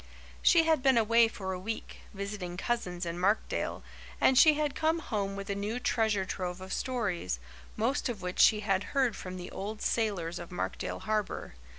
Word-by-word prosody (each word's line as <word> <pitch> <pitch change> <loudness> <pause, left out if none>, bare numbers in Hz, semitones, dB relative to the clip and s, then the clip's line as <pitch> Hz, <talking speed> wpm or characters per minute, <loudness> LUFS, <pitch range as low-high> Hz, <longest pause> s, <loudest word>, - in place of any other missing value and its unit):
She 335 -2 +6
had 320 -3 +3
been 265 -2 +4
away 230 +1 +5
for 190 -4 -5
a 180 - -4
week, 220 +4 -5
visiting 200 -3 -5
cousins 180 -5 -2
in 170 +1 -4
Markdale, 200 +4 0 0.4
and 265 - +5
she 305 +3 +7
had 295 -2 0
come 320 +1 +1
home 205 -10 -2
with 200 0 -6
a 200 - -1
new 205 +4 -3
treasure 220 -5 +1
trove 180 -1 -4
of 190 0 -6
stories, 200 - -1 0.4
most 250 +5 0
of 210 -6 -5
which 180 0 -4
she 210 -1 +6
had 195 -2 +1
heard 255 -6 +3
from 185 0 -7
the 180 0 -7
old 210 +2 -5
sailors 185 -7 -1
of 175 +2 -9
Markdale 180 - -3
Harbour. 215 - -2
210 Hz, 185 wpm, -30 LUFS, 185-235 Hz, 0.4 s, she